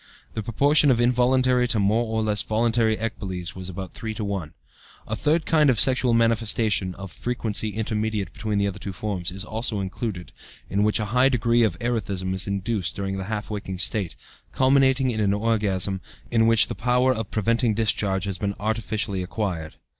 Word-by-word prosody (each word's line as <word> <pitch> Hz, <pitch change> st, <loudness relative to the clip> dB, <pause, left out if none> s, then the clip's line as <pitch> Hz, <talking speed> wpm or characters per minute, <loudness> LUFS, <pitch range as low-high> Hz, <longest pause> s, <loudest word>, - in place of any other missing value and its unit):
The 110 Hz, -, -3 dB
proportion 145 Hz, +7 st, +3 dB
of 120 Hz, -3 st, +3 dB
involuntary 125 Hz, +1 st, +3 dB
to 115 Hz, -3 st, +1 dB
more 110 Hz, +4 st, +2 dB
or 110 Hz, 0 st, -1 dB
less 105 Hz, -1 st, +2 dB
voluntary 110 Hz, 0 st, +1 dB
ecboles 95 Hz, -6 st, -4 dB
was 95 Hz, 0 st, -6 dB
about 95 Hz, 0 st, -7 dB
3 110 Hz, -1 st, -5 dB
to 110 Hz, -, -4 dB
1. 95 Hz, -6 st, -3 dB, 0.6 s
A 110 Hz, -, -2 dB
third 155 Hz, +7 st, +1 dB
kind 155 Hz, -3 st, +4 dB
of 120 Hz, -5 st, +2 dB
sexual 130 Hz, -2 st, +4 dB
manifestation 110 Hz, -4 st, +1 dB
(of 95 Hz, -2 st, -8 dB
frequency 110 Hz, -3 st, -2 dB
intermediate 110 Hz, -3 st, -2 dB
between 110 Hz, -2 st, -2 dB
the 100 Hz, -, +2 dB
other 100 Hz, -2 st, -3 dB
two 100 Hz, -, -6 dB
forms) 95 Hz, -3 st, -3 dB
is 95 Hz, +2 st, -3 dB
also 110 Hz, -1 st, -2 dB
included, 95 Hz, -1 st, -4 dB, 0.4 s
in 100 Hz, -, +1 dB
which 105 Hz, 0 st, +3 dB
a 105 Hz, -, -1 dB
high 125 Hz, +2 st, +5 dB
degree 120 Hz, -2 st, +2 dB
of 105 Hz, -8 st, +1 dB
erethism 100 Hz, -5 st, -2 dB
is 95 Hz, 0 st, +1 dB
induced 100 Hz, -1 st, -2 dB
during 95 Hz, -1 st, -3 dB
the 95 Hz, -, -4 dB
half 105 Hz, +1 st, -4 dB
waking 100 Hz, -3 st, -4 dB
state, 95 Hz, -1 st, -1 dB, 0.4 s
culminating 130 Hz, -1 st, +3 dB
in 110 Hz, -, -3 dB
an 100 Hz, -1 st, +2 dB
orgasm 100 Hz, -3 st, 0 dB, 0.3 s
in 115 Hz, -1 st, +3 dB
which 115 Hz, -1 st, +5 dB
the -, -, -4 dB
power 125 Hz, +1 st, +2 dB
of 110 Hz, -3 st, -4 dB
preventing 115 Hz, +1 st, +1 dB
discharge 100 Hz, -3 st, 0 dB
has 100 Hz, -2 st, -3 dB
been 100 Hz, -1 st, -2 dB
artificially 110 Hz, -2 st, -2 dB
acquired. 90 Hz, -4 st, -4 dB
110 Hz, 185 wpm, -24 LUFS, 100-115 Hz, 0.6 s, high